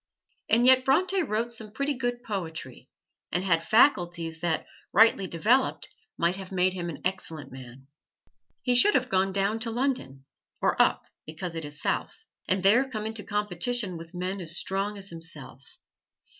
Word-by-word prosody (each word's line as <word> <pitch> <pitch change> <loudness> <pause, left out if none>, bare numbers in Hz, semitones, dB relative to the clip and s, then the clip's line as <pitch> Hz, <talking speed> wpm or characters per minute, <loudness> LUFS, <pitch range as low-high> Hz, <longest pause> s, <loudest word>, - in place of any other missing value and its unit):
And 235 +2 +4
yet 260 0 +6
Bronte 370 +9 +2
wrote 235 -4 -2
some 220 -2 -4
pretty 280 +4 -1
good 245 -2 -3
poetry, 160 - -6 0.4
and 180 - 0
had 165 -4 +2
faculties 175 - +2
that 165 -1 -1 0.3
rightly 210 -2 +5
developed 225 +11 +1 0.3
might 170 +2 +1
have 190 -1 -9
made 185 0 +2
him 175 -2 -4
an 160 - -8
excellent 175 -5 -4
man. 130 0 -11 0.8
He 250 - +2
should 330 +13 +5
have 255 -1 +1
gone 190 0 +2
down 200 +3 0
to 230 +1 0
London 225 - -2 0.3
(or - - +2
up, - - +2 0.2
because 165 +3 -5
it 165 -2 -4
is 145 0 -9
south) 445 - -3 0.2
and 185 0 +1
there 240 +7 +4
come 215 -4 -4
into 220 -1 -5
competition 210 0 -1
with 165 +2 -10
men 185 +2 -3
as 170 0 -4
strong 200 +2 -2
as 195 0 -3
himself. 165 -6 -4
190 Hz, 165 wpm, -27 LUFS, 165-235 Hz, 0.8 s, yet